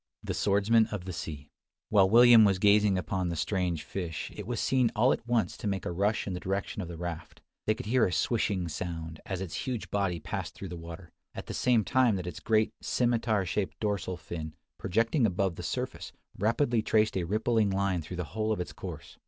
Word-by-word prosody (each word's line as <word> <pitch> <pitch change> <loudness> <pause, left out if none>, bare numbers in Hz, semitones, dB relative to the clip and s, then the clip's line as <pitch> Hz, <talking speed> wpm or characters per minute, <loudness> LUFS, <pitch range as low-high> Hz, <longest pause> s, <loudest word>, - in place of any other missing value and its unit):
THE - - -3
SWORDSMAN 105 +3 +3
OF 105 -5 -5
THE 95 - -5
SEA. 75 -3 -7 0.4
While 95 -3 +5
William 120 0 +8
was 100 -2 +4
gazing 105 0 +4
upon 90 -1 -1
the 85 - -2
strange 85 -1 -1
fish, 85 -4 -5
it 105 -1 -7
was 120 -2 -2
seen 130 -3 +2
all 120 +5 +4
at - - -6
once 120 -2 +1
to - - -4
make 95 -2 -2
a - - -2
rush 100 +5 0
in 95 - -3
the 90 - -3
direction 95 +2 -3
of 90 - -5
the 85 -1 -7
raft. 85 -1 -6 0.3
They 110 - +3
could - - -7
hear 115 0 +3
a - - -3
"swishing" 100 -3 0
sound, 80 -1 -5
as 95 -1 -3
its 95 -4 -5
huge 125 -4 -3
body 100 -4 0
passed - - -5
through 95 - -7
the 90 - -6
water, 85 +1 -9 0.2
at - - -6
the - - -6
same 120 -3 +3
time 125 -1 +3
that 90 -2 -4
its 90 -4 -6
great 110 -1 +2
scimitar 115 -4 +1
shaped 90 -2 -2
dorsal 100 -4 -2
fin, 80 -2 -7 0.2
projecting 115 - +2
above 95 -2 0
the - - -7
surface, - - -4 0.2
rapidly 115 +2 +1
traced 110 0 +2
a 95 - 0
rippling 110 +3 +1
line 95 -2 0
through 85 +3 -7
the 90 - -1
whole 110 0 0
of 110 - 0
its 90 - -4
course. - - -9
100 Hz, 215 wpm, -29 LUFS, 90-110 Hz, 0.4 s, William